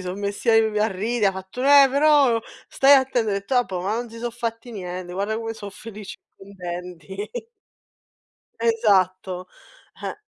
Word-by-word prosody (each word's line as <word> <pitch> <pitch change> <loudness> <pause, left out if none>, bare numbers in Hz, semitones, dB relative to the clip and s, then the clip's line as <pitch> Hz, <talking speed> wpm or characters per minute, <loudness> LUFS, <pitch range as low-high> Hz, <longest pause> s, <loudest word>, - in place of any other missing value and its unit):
son 185 +2 -5
messi 200 +3 -4
av 225 -1 +3
a 215 +1 +2
ride, 215 +3 0
ha - - +4
fatto: 190 +6 -8
“Eh, 280 0 +8
però 280 -4 +4 0.3
stai 275 +1 +5
atte” 265 -2 +3
ho - - +1
detto: 205 +3 -2
“Vabbuò, 195 -8 +1
ma 195 +4 -1
non 235 0 -4
si 230 - -10
so' 240 0 -4
fatti 235 0 -5
niente, 180 -3 -6
guarda 200 +4 -2
come 225 0 -4
so' 205 -2 -8
felici 210 -1 -10 0.2
contenti.” 180 0 -7 1.3
Esatto. 190 -5 +1 0.6
Eh. - - -4
215 Hz, 155 wpm, -23 LUFS, 190-235 Hz, 1.3 s, Eh